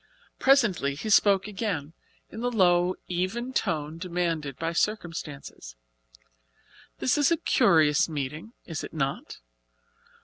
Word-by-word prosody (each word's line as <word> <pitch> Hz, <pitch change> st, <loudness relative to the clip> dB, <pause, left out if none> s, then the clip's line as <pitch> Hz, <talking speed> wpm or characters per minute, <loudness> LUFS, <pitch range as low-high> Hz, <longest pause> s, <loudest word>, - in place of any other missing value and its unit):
Presently 215 Hz, -, +3 dB
he 215 Hz, +9 st, -4 dB
spoke 200 Hz, -1 st, +4 dB
again, 185 Hz, -8 st, -3 dB, 0.4 s
in -, -, -8 dB
the 245 Hz, +1 st, 0 dB
low, 180 Hz, -4 st, +3 dB
even 195 Hz, +9 st, -2 dB
tone 155 Hz, -, -2 dB
demanded 170 Hz, -6 st, -2 dB
by 165 Hz, +1 st, -2 dB
circumstances. 165 Hz, -, -4 dB, 1.2 s
"This 265 Hz, -, +1 dB
is 290 Hz, -, +4 dB
a 335 Hz, -, +2 dB
curious 160 Hz, -, +3 dB
meeting, 150 Hz, -, -5 dB
is 165 Hz, -3 st, -5 dB
it -, -, -8 dB
not? 140 Hz, -, -3 dB
175 Hz, 115 wpm, -27 LUFS, 150-215 Hz, 1.2 s, spoke